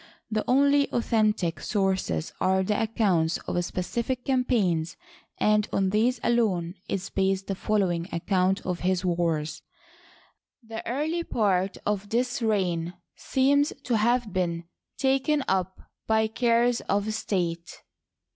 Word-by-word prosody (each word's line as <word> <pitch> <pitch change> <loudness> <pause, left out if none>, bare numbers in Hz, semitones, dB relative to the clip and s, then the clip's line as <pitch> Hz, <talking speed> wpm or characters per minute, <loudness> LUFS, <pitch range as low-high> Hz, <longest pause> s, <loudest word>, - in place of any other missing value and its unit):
The 215 0 0
only 280 +2 +4
authentic 215 -7 +1
sources 190 - -1
are 190 0 +2
the 210 +3 0
accounts 195 -8 +1
of 175 - 0
specific 235 +8 -3
campaigns, 215 -11 +1 0.4
and 210 0 +2
on 190 -1 +1
these 230 +4 +2
alone 195 -8 +1 0.2
is 195 0 -3
based 195 0 0
the 195 - -2
following 185 -4 0
ac 170 -3 -5
count 190 0 +1
of 180 -2 -2
his 185 0 0
wars. 165 -4 -1 1.0
The 225 0 -6
early 310 +7 -1
part 195 - 0
of 205 -1 -1
this 245 +2 0
reign 180 -6 0 0.2
seems 285 +2 +2
to 240 -3 +1
have 235 -1 +1
been 170 -2 -1 0.3
taken 270 +2 +1
up 190 0 -1 0.3
by 220 0 +3
cares 235 +1 +2
of 205 +2 0
state. 170 -6 -3
205 Hz, 125 wpm, -26 LUFS, 180-235 Hz, 1.0 s, only